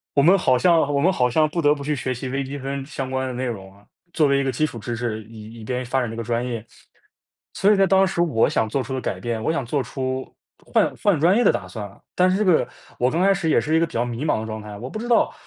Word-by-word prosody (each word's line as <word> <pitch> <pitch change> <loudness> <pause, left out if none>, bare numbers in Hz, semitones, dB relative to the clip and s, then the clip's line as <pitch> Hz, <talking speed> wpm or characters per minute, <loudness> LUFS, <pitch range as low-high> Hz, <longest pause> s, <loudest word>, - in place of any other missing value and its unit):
我 140 - +5
们 180 +6 +6
好 130 -7 +3
像 170 +2 +4
我 140 - +2
们 185 +6 +3
好 125 -8 +1
像 155 +5 +3
不 170 +1 -2
得 145 0 +4
不 145 - -7
去 150 +1 -1
学 130 0 -2
习 130 +2 -6
微 135 +2 -2
积 140 +2 -6
分 135 0 -4
相 135 -2 -5
关 130 0 -1
的 130 - -4
内 130 +1 -3
容 95 -5 -6
啊， 100 +1 -22 0.3
作 155 -4 +3
为 140 0 +3
一 - - 0
个 135 - 0
基 155 +6 +1
础 120 - -6
知 115 +1 -5
识， 110 -2 -3
以 110 +1 -11
以 - - -9
便 125 +2 -3
发 130 +2 0
展 120 - -2
这 115 - -7
个 - - -2
专 120 +1 -1
业。 115 -3 -4 0.9
所 200 +2 +3
以 205 - +4
在 195 -1 +4
当 190 +1 +4
时 180 -2 -1
我 125 -10 +2
想 110 - +1
做 135 +2 -1
出 130 - -6
的 130 - -1
改 - - -3
变， 115 -2 -3
我 - - 0
想 140 -6 -2
做 140 +3 -1
出 130 0 -4 0.3
换 - - +2
换 200 -8 +3
专 175 +5 +4
业 245 - +3
的 - - +5
打 95 - -3
算 100 +2 -6
了。 100 - -20
但 180 0 +4
是 190 - +1
这 215 - +1
个， 175 -4 +3 0.3
我 125 +1 +3
刚 170 +3 0
开 195 +1 +5
始 170 -4 -1
也 - - +4
是 155 +2 0
一 - - +5
个 165 - +3
比 - - -16
较 120 - +1
迷 120 +5 -4
茫 150 - +1
的 - - -5
状 110 -1 -5
态， 105 -1 -9
我 125 +5 -7
不 215 - -6
知 240 - -5
道 235 - +3
130 Hz, 340 characters per minute, -22 LUFS, 115-160 Hz, 0.9 s, 们